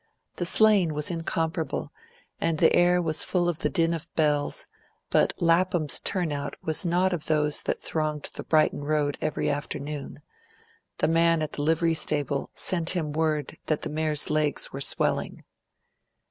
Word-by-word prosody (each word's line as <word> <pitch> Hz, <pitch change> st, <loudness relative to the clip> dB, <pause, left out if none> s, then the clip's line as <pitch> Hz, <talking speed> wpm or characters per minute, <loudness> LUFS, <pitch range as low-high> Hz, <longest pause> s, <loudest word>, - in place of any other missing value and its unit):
The 175 Hz, -, 0 dB
sleighing 195 Hz, -5 st, +5 dB
was 150 Hz, +3 st, -2 dB
incomparable, 165 Hz, 0 st, -3 dB, 0.5 s
and 165 Hz, -1 st, 0 dB
the -, -, +4 dB
air 175 Hz, 0 st, +4 dB
was 160 Hz, -3 st, +1 dB
full 175 Hz, -2 st, 0 dB
of 175 Hz, -3 st, -2 dB
the -, -, 0 dB
din 165 Hz, -3 st, +1 dB
of 165 Hz, -, -6 dB
bells; 150 Hz, -2 st, 0 dB, 0.5 s
but -, -, +3 dB
Lapham's 170 Hz, -2 st, +3 dB
turnout 155 Hz, -7 st, -2 dB
was 160 Hz, +4 st, +2 dB
not 180 Hz, +2 st, +1 dB
of 165 Hz, -4 st, -4 dB
those 150 Hz, -1 st, +1 dB
that -, -, -3 dB
thronged 155 Hz, -2 st, -3 dB
the -, -, -6 dB
Brighton 155 Hz, -2 st, +1 dB
road 145 Hz, -1 st, 0 dB
every 155 Hz, -, -2 dB
afternoon; 145 Hz, 0 st, -4 dB, 0.7 s
the -, -, +1 dB
man 165 Hz, 0 st, +2 dB
at 155 Hz, -, -4 dB
the -, -, -4 dB
livery 165 Hz, +2 st, +1 dB
stable 145 Hz, -3 st, 0 dB
sent 170 Hz, -2 st, 0 dB
him 155 Hz, -4 st, -2 dB
word 155 Hz, -1 st, -2 dB
that 155 Hz, -, -1 dB
the -, -, -3 dB
mare's 155 Hz, -1 st, 0 dB
legs 150 Hz, -2 st, 0 dB
were 135 Hz, -, -5 dB
swelling. -, -, 0 dB
155 Hz, 160 wpm, -26 LUFS, 150-170 Hz, 0.7 s, sleighing